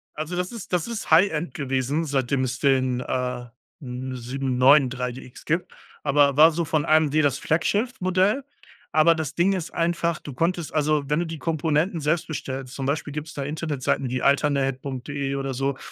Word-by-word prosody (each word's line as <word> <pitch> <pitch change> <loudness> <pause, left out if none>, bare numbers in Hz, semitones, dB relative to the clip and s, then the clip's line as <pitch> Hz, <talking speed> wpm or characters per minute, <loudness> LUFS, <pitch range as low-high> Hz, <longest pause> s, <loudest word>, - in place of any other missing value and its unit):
Also, 155 +3 -4
das 180 +1 -2
ist 215 -6 -8
das 175 +2 +1
ist 230 -2 -5
High-End 160 -4 +3
gewesen, 135 +3 -1
seitdem 135 -1 0
es 130 0 -3
den, 130 -3 +2
äh, 125 -1 -3 0.3
n 130 0 -6
793DX 125 0 +1
gibt, 165 +3 -1 0.3
aber 140 -1 +3
war 160 +2 +9
so 170 +1 -2
von 155 -1 0
AMD 155 -2 +3
das 140 -2 +2
Flaggschiff-Modell. 195 - +1 0.5
Aber 155 +2 +6
das 160 -1 -4
Ding 185 +3 +3
ist 175 -4 -4
einfach, 170 -1 0
du 145 - -9
konntest 170 +3 -1
also, 150 -1 +1
wenn 150 +2 +1
du 175 - -1
die 165 - -6
Komponenten 160 +2 0
selbst 155 +3 0
bestellst, 135 -3 -5
zum 135 - -4
Beispiel 145 0 -2
gibt's 150 0 -6
da 140 - -4
Internetseiten 145 -3 -2
wie 130 0 -2
alternate.de 140 -1 0
oder 135 -1 -3
so. 135 +1 -1
145 Hz, 165 wpm, -24 LUFS, 135-165 Hz, 0.5 s, war